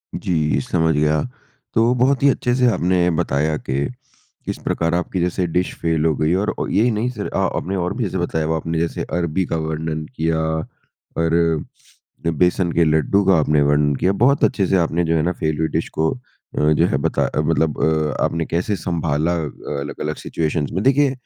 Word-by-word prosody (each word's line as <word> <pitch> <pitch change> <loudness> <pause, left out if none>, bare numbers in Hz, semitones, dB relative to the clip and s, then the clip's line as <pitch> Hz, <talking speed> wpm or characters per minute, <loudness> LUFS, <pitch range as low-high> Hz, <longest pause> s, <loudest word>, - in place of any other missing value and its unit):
जी, 75 -6 0
समझ 80 0 +1
गया। 75 +1 +2 0.5
तो 115 +2 +3
बहुत 130 +2 +2
ही 140 - +6
अच्छे 125 -1 0
से 125 -1 +3
आपने 90 -1 +2
बताया 75 +3 0
कि 70 +2 -2 0.6
किस - - -3
प्रकार 85 0 0
आपकी 90 +1 -2
जैसे 90 +1 0
डिश 90 +2 -1
फ़ेल 80 -1 +1
हो 80 - +2
गई 75 +4 +1
और 100 +3 0
अ, - - -1
ये 115 +4 +3
नहीं 110 +4 -1
सिर्फ़ 105 -5 -5
अ, - - +1 0.2
आपने 95 +2 -3
और 90 0 -1
भी 125 - -1
जैसे 95 -2 -2
बताया 80 -3 -1
आपने 80 +1 -2
जैसे 85 - -2 0.2
अरबी 85 +2 0
का 80 - -2
वर्णन 80 0 -3
किया 80 -3 0 0.8
और 80 -1 +2 0.6
बेसन 85 +2 +1
के 85 - +3
लड्डू 80 +6 +2
का 95 -3 +5
आपने 75 -1 +2
वर्णन 75 0 +2
किया, 95 +7 +1
बहुत 125 +8 +2
अच्छे 100 -7 +2
से 95 - +3
आपने 85 0 +1
जो 80 - +1
है 80 - +2
ना 90 - +1
फ़ेल 80 -2 -2
हुई 80 - +1
डिश 80 - -2
को 80 0 +2
अ, 125 - -11 0.5
जो 85 +3 +3
है 75 - 0
बता - - 0
मतलब 80 -2 0
अ, 75 -2 +1
आपने 80 -1 0
कैसे 90 +5 -1
सँभाला 80 -2 -1 0.5
अलग-अलग 75 +2 -4
सिचुएशंस 75 -2 -2
में। 95 +4 -1
देखिए 140 0 +4
85 Hz, 190 wpm, -20 LUFS, 80-95 Hz, 0.8 s, ही